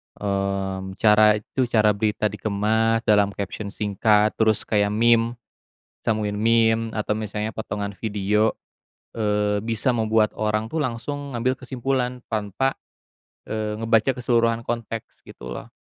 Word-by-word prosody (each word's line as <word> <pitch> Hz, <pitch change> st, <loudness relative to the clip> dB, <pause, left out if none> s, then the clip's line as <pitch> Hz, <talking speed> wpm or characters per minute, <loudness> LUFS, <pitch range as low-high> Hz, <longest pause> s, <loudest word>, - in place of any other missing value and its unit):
Mmm, 95 Hz, -1 st, -2 dB
cara 105 Hz, 0 st, +5 dB
itu, 120 Hz, +4 st, -2 dB
cara 110 Hz, -3 st, +4 dB
berita 105 Hz, 0 st, 0 dB
dikemas 110 Hz, +2 st, 0 dB
dalam 105 Hz, -2 st, +3 dB
caption 100 Hz, +1 st, -5 dB
singkat 105 Hz, +1 st, +2 dB
terus 110 Hz, -2 st, +3 dB
kayak 105 Hz, -1 st, +1 dB
meme, 115 Hz, +2 st, +3 dB, 0.7 s
sambungin 105 Hz, -2 st, 0 dB
meme 115 Hz, +1 st, +3 dB
atau 105 Hz, -1 st, -1 dB
misalnya 105 Hz, 0 st, -4 dB
potongan 100 Hz, -2 st, -4 dB
video, 105 Hz, +1 st, +1 dB, 0.6 s
eee, 105 Hz, -2 st, 0 dB
bisa 115 Hz, +4 st, 0 dB
membuat 110 Hz, -2 st, +2 dB
orang 110 Hz, +1 st, -2 dB
tuh 160 Hz, -, -1 dB
langsung 140 Hz, +1 st, -4 dB
ngambil 125 Hz, +2 st, +1 dB
kesimpulan 125 Hz, -1 st, -2 dB
tanpa, 110 Hz, +5 st, 0 dB, 0.7 s
eee, 110 Hz, -1 st, -3 dB
ngebaca 115 Hz, +3 st, +2 dB
keseluruhan 115 Hz, -2 st, +1 dB
konteks 115 Hz, -1 st, -5 dB
gitu -, -, -9 dB
loh. -, -, -7 dB
110 Hz, 125 wpm, -23 LUFS, 105-115 Hz, 0.7 s, cara